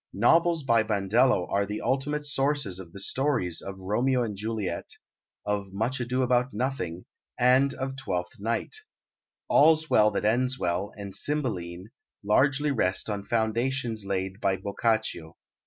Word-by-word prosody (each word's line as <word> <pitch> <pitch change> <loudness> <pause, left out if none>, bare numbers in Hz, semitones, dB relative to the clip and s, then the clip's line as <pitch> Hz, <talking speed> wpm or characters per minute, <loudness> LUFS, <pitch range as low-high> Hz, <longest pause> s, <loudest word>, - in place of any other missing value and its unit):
Novels 165 - +3
by 115 -4 +3
Bandello 110 0 +2
are 100 - +2
the 105 +1 -4
ultimate 145 +4 -1
sources 140 -9 0
of 85 -3 -9
the 100 - -10
stories 115 - 0
of 95 0 -7
Romeo 120 +7 +1
and 110 -3 -4
Juliet, 110 0 -3 0.6
of 100 -1 -2
Much 115 +7 -1
Ado 125 +2 0
about 125 +1 +1
Nothing, 105 -10 -3 0.3
and 130 +3 +4
of 135 0 -4
Twelfth 90 -3 -4
Night. 115 - -2 0.7
All's 155 +1 +4
Well 105 0 +6
that 105 0 -2
Ends 125 +4 +2
Well 90 0 -1
and 100 -2 -7
Cymbeline 100 - -3 0.3
largely 140 +7 +2
rest 105 -4 +1
on 100 -1 -3
foundations 115 +1 -1
laid 95 0 -3
by 95 -1 +1
Boccaccio. 100 -4 -2
110 Hz, 140 wpm, -27 LUFS, 100-130 Hz, 0.7 s, Well